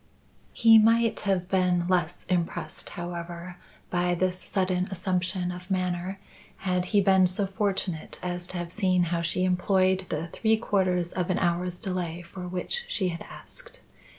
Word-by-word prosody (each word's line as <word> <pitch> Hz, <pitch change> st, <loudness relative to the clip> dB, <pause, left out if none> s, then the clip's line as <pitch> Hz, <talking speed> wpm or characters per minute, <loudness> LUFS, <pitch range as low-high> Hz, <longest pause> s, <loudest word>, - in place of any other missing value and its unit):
He 225 Hz, -1 st, +7 dB
might 230 Hz, +1 st, +4 dB
have 180 Hz, -2 st, +1 dB
been 180 Hz, -2 st, +2 dB
less 175 Hz, -2 st, 0 dB
impressed, 175 Hz, -2 st, -2 dB
however, 175 Hz, 0 st, -6 dB, 0.3 s
by 175 Hz, 0 st, +1 dB
this 185 Hz, +1 st, -1 dB
sudden 185 Hz, -2 st, 0 dB
assumption 185 Hz, -1 st, -1 dB
of 180 Hz, +1 st, -9 dB
manner, 185 Hz, 0 st, -1 dB, 0.5 s
had 180 Hz, -1 st, +1 dB
he 200 Hz, +2 st, +3 dB
been 190 Hz, -1 st, +5 dB
so 185 Hz, +3 st, -1 dB
fortunate 190 Hz, -4 st, -2 dB
as 175 Hz, 0 st, -3 dB
to 185 Hz, -, -5 dB
have 175 Hz, -1 st, -4 dB
seen 185 Hz, -3 st, +2 dB
how 170 Hz, -, +1 dB
she 170 Hz, +2 st, 0 dB
employed 185 Hz, 0 st, +2 dB
the 160 Hz, +2 st, -3 dB
three 220 Hz, +5 st, +2 dB
quarters 185 Hz, -5 st, 0 dB
of 180 Hz, -1 st, -2 dB
an 185 Hz, -, +1 dB
hour's 175 Hz, 0 st, 0 dB
delay 175 Hz, -4 st, -3 dB
for 180 Hz, +1 st, -8 dB
which 185 Hz, -, -2 dB
she 190 Hz, -, 0 dB
had 170 Hz, -1 st, -5 dB
asked. -, -, -11 dB
180 Hz, 155 wpm, -27 LUFS, 175-190 Hz, 0.5 s, He